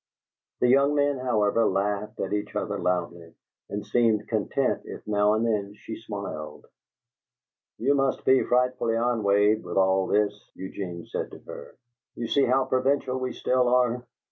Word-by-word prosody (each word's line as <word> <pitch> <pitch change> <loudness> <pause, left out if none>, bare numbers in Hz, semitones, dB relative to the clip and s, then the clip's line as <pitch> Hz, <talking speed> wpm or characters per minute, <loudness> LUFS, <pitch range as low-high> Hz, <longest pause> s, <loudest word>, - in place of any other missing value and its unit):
The 125 - +4
young 140 +3 +4
men, 145 -2 +1
however, 115 -3 +2
laughed 105 +2 -1
at - - -2
each 105 0 -3
other - - -2
loudly, 85 -2 -2 0.3
and 105 0 -4
seemed 115 -3 +2
content 115 +4 0
if - - -9
now 105 0 +2
and 110 +1 0
then 105 -3 -1
she 110 - -8
smiled. 100 -8 -7 1.1
"You 135 +5 +2
must 135 -1 0
be 130 0 +5
frightfully 125 -2 +1
ennuied 110 -3 +2
with - - -5
all 95 0 +3
this," 105 0 0
Eugene 90 -3 -6
said - - -4
to - - -11
her. - - -10 0.4
"You 120 - -4
see 140 +4 +3
how 130 +2 +2
provincial 130 0 0
we 130 0 -2
still 125 -1 +1
are." 125 0 +2
110 Hz, 155 wpm, -26 LUFS, 100-125 Hz, 1.1 s, be